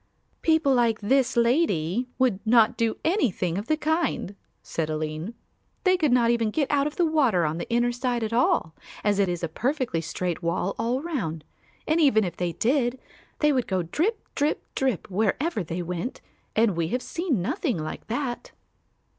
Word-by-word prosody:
"People 320 Hz, -4 st, +3 dB
like 235 Hz, -3 st, +2 dB
this 255 Hz, +4 st, +2 dB
lady 235 Hz, -, +2 dB
would 250 Hz, -7 st, +2 dB
not 225 Hz, -1 st, +4 dB
do 225 Hz, -1 st, 0 dB
anything 230 Hz, -, +1 dB
of 205 Hz, -, -7 dB
the 310 Hz, -, +2 dB
kind," 315 Hz, -, -1 dB, 0.3 s
said 160 Hz, -2 st, -3 dB
Aline; 155 Hz, +7 st, -3 dB, 0.5 s
"they 370 Hz, -2 st, +4 dB
could 310 Hz, -7 st, +1 dB
not 240 Hz, -1 st, +4 dB
even 230 Hz, -2 st, +1 dB
get 280 Hz, +5 st, -1 dB
out 285 Hz, 0 st, +2 dB
of 300 Hz, -, -6 dB
the 350 Hz, -, +2 dB
water 260 Hz, -, +2 dB
on 155 Hz, +2 st, -2 dB
the -, -, -5 dB
inner 240 Hz, +1 st, +2 dB
side 245 Hz, -1 st, -1 dB
at 220 Hz, +1 st, -3 dB
all, 195 Hz, -9 st, +2 dB, 0.3 s
as 205 Hz, -1 st, +2 dB
it 195 Hz, -2 st, +3 dB
is 175 Hz, -1 st, -3 dB
a -, -, +1 dB
perfectly 240 Hz, -, -1 dB
straight 170 Hz, +2 st, -3 dB
wall 170 Hz, +3 st, -1 dB
all 250 Hz, +4 st, 0 dB
round, 195 Hz, -, -3 dB, 0.4 s
and 315 Hz, +2 st, +3 dB
even 220 Hz, -8 st, +5 dB
if 175 Hz, -3 st, -3 dB
they 175 Hz, -1 st, -2 dB
did, 250 Hz, -, +1 dB, 0.4 s
they 300 Hz, -1 st, +4 dB
would 255 Hz, -3 st, 0 dB
go 185 Hz, -2 st, 0 dB
drip, 345 Hz, -, -1 dB
drip, 295 Hz, +2 st, 0 dB
drip, 260 Hz, -8 st, -1 dB
wherever 220 Hz, -, 0 dB
they 170 Hz, +2 st, -4 dB
went 180 Hz, +8 st, -4 dB, 0.4 s
and 220 Hz, -4 st, +3 dB
we 165 Hz, -1 st, 0 dB
have 250 Hz, +8 st, -2 dB
seen 335 Hz, -, -1 dB
nothing 255 Hz, -, -1 dB
like 155 Hz, 0 st, -6 dB
that." 240 Hz, +2 st, -3 dB
235 Hz, 180 wpm, -26 LUFS, 180-280 Hz, 0.5 s, even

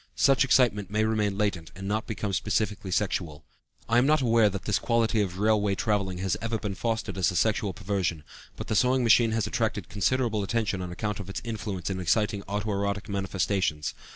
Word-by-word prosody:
Such 135 Hz, 0 st, +4 dB
excitement 120 Hz, -7 st, +3 dB
may 110 Hz, +1 st, +1 dB
remain 105 Hz, -3 st, 0 dB
latent 100 Hz, -6 st, -1 dB
and 95 Hz, 0 st, -6 dB
not 110 Hz, +2 st, -1 dB
become 105 Hz, -3 st, -3 dB
specifically 105 Hz, 0 st, -1 dB
sexual. 85 Hz, -5 st, -2 dB, 0.4 s
I 115 Hz, +1 st, +4 dB
am 130 Hz, -, +3 dB
not 155 Hz, +1 st, +4 dB
aware 115 Hz, -4 st, +4 dB
that 100 Hz, -1 st, -5 dB
this 100 Hz, -5 st, +1 dB
quality 115 Hz, 0 st, +1 dB
of 90 Hz, -3 st, -3 dB
railway 105 Hz, -1 st, +2 dB
traveling 100 Hz, -4 st, -1 dB
has 95 Hz, 0 st, -1 dB
ever 115 Hz, 0 st, -1 dB
been 105 Hz, -2 st, -4 dB
fostered 110 Hz, -1 st, -2 dB
as 90 Hz, -, +3 dB
a 90 Hz, -, -4 dB
sexual 105 Hz, +2 st, +1 dB
perversion, 90 Hz, -4 st, -2 dB, 0.3 s
but -, -, -6 dB
the 110 Hz, -, -2 dB
sewing 125 Hz, +3 st, +3 dB
machine 115 Hz, 0 st, +5 dB
has 110 Hz, -2 st, 0 dB
attracted 105 Hz, -5 st, -2 dB
considerable 110 Hz, +2 st, 0 dB
attention 100 Hz, -2 st, -1 dB
on 90 Hz, -1 st, -5 dB
account 105 Hz, +4 st, -3 dB
of 100 Hz, -1 st, -7 dB
its 95 Hz, -, -4 dB
influence 100 Hz, -5 st, -4 dB
in 95 Hz, -, -3 dB
exciting 105 Hz, +3 st, +1 dB
auto 105 Hz, +2 st, -2 dB
erotic 100 Hz, +1 st, -2 dB
manifestations. 95 Hz, -5 st, -1 dB
105 Hz, 195 wpm, -27 LUFS, 95-110 Hz, 0.4 s, machine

